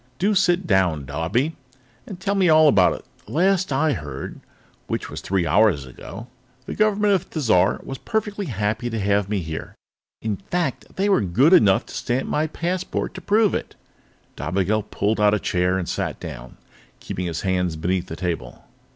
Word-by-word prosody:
"Do 205 +3 +2
sit 185 -1 +2
down, 90 -8 +2
Dobbie, 90 - -1 0.5
and 190 -4 -8
tell 195 +1 -1
me 190 -3 +3
all 155 0 +7
about 95 -10 +5
it. - - -9 0.2
The - - -9
last 185 +1 +2
I 145 +3 +2
heard 75 - -6 0.5
which - - -3
was - - -6
three 95 -2 0
hours 85 -4 +3
ago 95 - -9 0.4
the - - -5
government 210 -1 +2
of 190 -1 +1
Thizar 115 - +2
was 135 - -7
perfectly 210 -3 -2
happy 110 +1 -1
to 115 -1 -3
have 100 0 +1
me 105 -2 0
here. 80 0 -6 0.5
In 110 -3 -1
fact, 170 - -3
they 195 +2 +1
were 200 - +4
good 120 - +3
enough 100 - +5
to - - -12
stamp 125 +2 -1
my 155 +1 0
passport 175 +4 -3
to 185 - -8
prove 210 +1 +3
it." - - -4 0.6
Dobigel 100 +4 -1
pulled 105 +2 0
out 105 0 +5
a - - -1
chair 90 0 +1
and 90 -2 -3
sat - - -3
down, - - -9 0.4
keeping 90 0 -4
his 85 -1 -3
hands 90 -3 0
beneath 90 +3 -1
the 80 - -6
table. 85 -1 -4
110 Hz, 180 wpm, -23 LUFS, -, 0.6 s, all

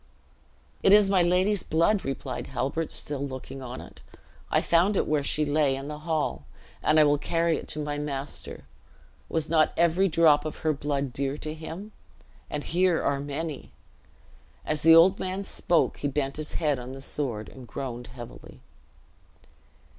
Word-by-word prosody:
"It 195 - +6
is 205 -1 +6
my 190 -2 +4
lady's 180 +3 +2
blood," 170 +6 +2
replied 135 - -4
Halbert, 135 +5 -2
still 145 -2 -4
looking 135 0 -6
on 125 0 -6
it. - - -14 0.5
"I - - +3
found 180 +4 +3
it - - +2
where 150 -1 +1
she 150 +2 0
lay, 145 -2 +2
in 135 +2 -6
the 150 0 -6
hall, 155 -1 -2 0.4
and 155 +1 +4
I - - +8
will 145 -1 +3
carry 165 +1 +1
it - - -8
to 155 - -4
my 145 -1 -3
master. 140 -1 -5 0.7
Was 160 -1 -1
not 160 -2 +3
every 170 +3 +3
drop 155 -3 +5
of 155 - -4
her 155 - +3
blood 140 -2 -2
dear 140 +2 -2
to 155 0 -5
him? 165 +6 -8 0.6
and 145 -1 -3
here 180 0 +2
are 140 -1 0
many." 145 +1 -5 0.9
As 150 -1 -1
the 165 0 +8
old 180 +4 +6
man 185 +1 -3
spoke 175 -3 +1
he 145 - -2
bent 140 0 -2
his 155 -1 -6
head 150 -5 0
on 125 +1 -7
the 135 - -9
sword, 125 -6 -3
and 130 -2 -12
groaned 125 -2 -5
heavily. 120 -2 -11
150 Hz, 170 wpm, -27 LUFS, 140-165 Hz, 0.9 s, I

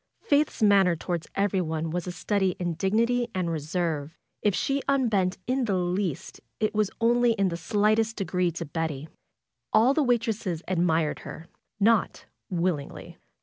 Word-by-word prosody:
Faith's 290 -5 +1
manner 195 -4 +5
toward 170 0 -4
everyone 170 -5 0
was 175 +1 -3
a - - -2
study 190 +1 0
in 175 -2 -2
dignity 230 +7 +1
and 180 -2 -1
reserve. 160 -1 -2 0.2
If 205 -3 +2
she 275 0 0
unbent 215 -9 +1
in 255 +1 0
the 200 -4 0
least 180 0 -2 0.2
it 215 - 0
was 210 -2 +1
only 240 +1 +3
in 195 -4 0
a - - -2
slight 210 +5 +2
degree 180 -3 0
to 170 0 -5
Betty. 155 -1 -4 0.6
All 230 +5 +5
the 310 - +2
waitresses 225 - 0
admired 165 -4 +1
her; 160 - -9 0.3
not 220 0 +2 0.2
willingly. 170 -5 -3
190 Hz, 150 wpm, -26 LUFS, 170-220 Hz, 0.6 s, manner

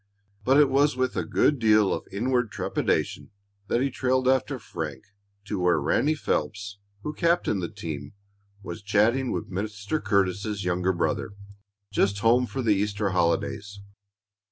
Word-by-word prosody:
But 135 +4 +4
it 150 - +6
was 140 0 +2
with 130 0 0
a - - 0
good 145 - +2
deal 110 -3 +4
of - - -5
inward 120 +2 0
trepidation - - -1 0.4
that 120 - +1
he 135 0 0
trailed 130 0 +1
after 130 +1 +2
Frank 75 - -6 0.4
to 105 -1 -3
where 90 -3 +3
Ranny 140 - +1
Phelps, 100 -8 -2 0.2
who 150 - -3
captained 170 - +1
the 85 - -3
team, 80 -8 -6 0.5
was 85 -1 -7
chatting 110 +6 +2
with 90 +1 -4
Mr. 105 +8 -3
Curtis's 100 0 0
younger 90 +1 +1
brother, 85 +2 -1 0.6
just 100 0 +2
home 120 +2 +4
for 130 +1 -4
the 110 -2 +4
Easter 105 0 0
holidays. 100 +3 -1
105 Hz, 150 wpm, -26 LUFS, 95-130 Hz, 0.6 s, it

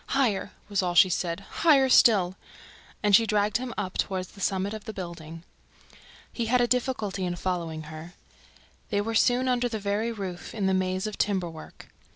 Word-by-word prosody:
"Higher!" 215 -7 +1 0.2
was 200 -2 0
all 175 -1 -2
she 185 +2 +7
said. 175 +1 -2 0.2
"Higher 285 -5 +5
still!" 195 -8 +5 0.7
And 205 -1 +6
she 225 +1 +4
dragged 210 0 +1
him 250 0 -5
up 190 -3 -4
toward 185 -2 -1
the 200 +2 -14
summit. 195 +1 -1 1.6
He 235 - -2
had 250 +2 +3
a 245 - +4
difficulty 240 -6 -1
in 175 -1 -2
following 170 -3 -3
her. 155 +3 -10 0.7
They 205 - 0
were 225 +2 -3
soon 245 +3 +3
under 245 -1 +1
the 225 - -3
very 210 +3 -1
roof, 195 -4 -6
in 205 -3 -1
the 190 - +2
maze 185 +1 0
of 215 -1 -5
timber 190 -4 0
work. 160 - -12
200 Hz, 175 wpm, -27 LUFS, 185-230 Hz, 1.6 s, she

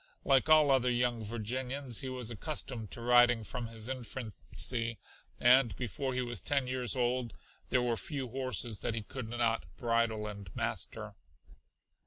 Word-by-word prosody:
Like 135 +2 +4
all 155 -2 +7
other 130 -2 +4
young 120 -2 +1
Virginians 125 +3 -2
he 130 - -4
was 125 -3 -3
accustomed 120 -3 -4
to 120 - -4
riding 120 -1 +5
from 120 +1 -4
his 115 -1 -2
infancy, 120 -1 -3 0.4
and 120 -4 +5
before 130 +3 -3
he 125 - +1
was 120 0 -1
ten 140 -2 +2
years 125 -3 0
old 125 -1 0 0.4
there 125 -1 +3
were 120 -1 +1
few 130 +7 -4
horses 130 -4 -2
that 115 - -2
he 110 - -2
could 120 +1 -7
not 115 -1 0
bridle 115 -2 +1
and 100 -3 -7
master. - - -3
120 Hz, 155 wpm, -32 LUFS, 115-130 Hz, 0.4 s, all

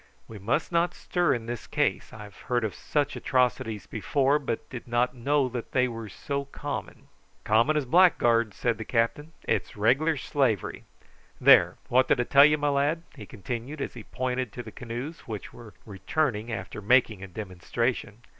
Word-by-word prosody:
"We 110 -2 -10
must 115 - -1
not 170 +1 +1
stir 175 -1 0
in 115 -2 -6
this 120 0 -6
case. - - -1
I've 105 -3 -11
heard 120 -1 +1
of 110 - -2
such 145 -1 -1
atrocities 115 -5 0
before, 140 +6 +1
but 130 -5 -4
did 125 -1 -7
not 120 +1 +1
know 140 +3 +1
that 120 -1 -6
they 130 -1 +3
were 115 -3 -7
so 140 +7 -4
common." 140 - -6 0.4
"Common 115 +8 +3
as 145 - 0
blackguards," 120 - +4
said 120 -2 0
the - - -3
captain, 125 +8 -1
"It's - - -2
regular 135 +9 +2
slavery. 130 -7 -1 0.5
There, - - +6
what 130 +1 +3
did - - +2
I - - +3
tell 140 +3 +7
you, 150 0 +4
my 145 0 0
lad?" 145 +4 +1
he - - -10
continued, 125 - -6
as - - -4
he 120 - -9
pointed 130 0 -3
to 125 - -6
the - - -10
canoes, 125 +7 -7
which 110 -3 -6
were 115 -6 -13
returning 115 +2 -2
after 110 -1 -5
making 110 -2 +3
a 95 - -7
demonstration. 105 +4 -3
120 Hz, 175 wpm, -27 LUFS, 110-140 Hz, 0.5 s, tell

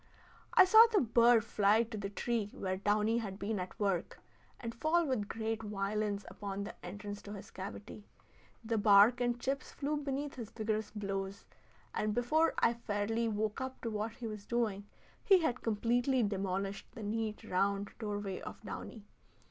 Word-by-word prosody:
I - - +9
saw 440 +5 +9
the 420 - +4
bird 235 -1 +5
fly 210 +1 +3
to 230 -1 -7
the 200 -2 -4
tree 220 0 -1
where 185 -1 -2
downy 210 +3 +2
had 195 -4 -5
been 210 0 -2
at 180 0 -6
work, 195 -4 -1 0.4
and 230 -1 -5
fall 325 +7 +2
with 250 -8 -1
great 225 0 -3
violence 205 0 -2
upon 200 -1 -5
the 205 - -6
entrance 205 0 -6
to 205 - -8
his 200 0 -9
cavity. 205 +2 -8 0.6
The 225 -1 0
bark 205 +4 +6
and 240 0 +2
the - - -15
chips 270 +2 -3
flew 295 +1 -2
beneath 280 0 -3
his 230 -4 -6
vigorous 220 -1 -2
blows, 195 -1 -4 0.5
and 210 0 -1
before 310 +7 +2
I 230 - +4
fairly 225 0 -1
woke 215 +2 -1
up 260 0 -5
to 230 - -3
what 215 +1 -2
he 235 - -8
was 210 -2 -6
doing, 215 -4 -1 0.4
he 385 -3 +6
had 255 -5 0
completely 240 +4 +1
demolished 195 -1 -2
the 220 - -8
neat, 215 0 -2
round 200 +2 0
doorway 205 -3 -3
of - - -8
downy. 215 -3 -7
215 Hz, 170 wpm, -33 LUFS, 205-235 Hz, 0.6 s, I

